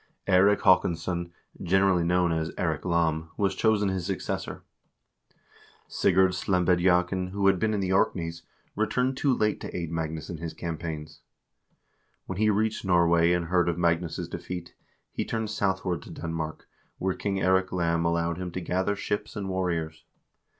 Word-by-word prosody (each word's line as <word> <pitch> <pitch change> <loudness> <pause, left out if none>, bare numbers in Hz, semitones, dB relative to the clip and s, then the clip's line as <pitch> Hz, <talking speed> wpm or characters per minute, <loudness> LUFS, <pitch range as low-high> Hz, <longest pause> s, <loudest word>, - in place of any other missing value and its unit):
Eirik 100 +2 +4
Haakonsson, 85 -1 +2 0.3
generally 95 -1 +3
known 90 0 +2
as 80 0 -1
Eirik 80 -3 -1
Lam, 80 -2 +1
was 100 -2 +1
chosen 105 -3 +2
his 95 -2 -2
successor. 95 -2 -4 1.2
Sigurd 95 0 +3
Slembediakn, 90 0 +2
who 100 +1 -2
had 95 -2 +4
been 110 +2 +1
in 105 -2 0
the 95 0 0
Orkneys, 85 -3 0 0.3
returned 125 +5 0
too 140 +1 +1
late 105 -4 +1
to - - -5
aid 85 -2 -4
Magnus 80 -1 -3
in 85 - -6
his 80 0 -6
campaigns. 80 -2 -6 1.0
When 95 0 -5
he 110 0 +4
reached 110 +1 0
Norway, 85 -2 +4
and 90 -1 +1
heard 90 +1 +2
of 85 - -2
Magnus' 85 -1 0
defeat, 90 -2 -6 0.4
he - - -2
turned 110 -2 -3
southward 95 -5 -1
to - - -12
Denmark, 80 -1 -5 0.3
where 95 0 0
King 100 +1 -2
Eirik 95 0 +2
Lam 85 -2 +1
allowed 85 0 0
him 90 -1 -4
to - - -2
gather 95 +3 -1
ships 105 +2 -3
and 100 -2 -4
warriors. 85 -4 -2
90 Hz, 155 wpm, -27 LUFS, 85-95 Hz, 1.2 s, Eirik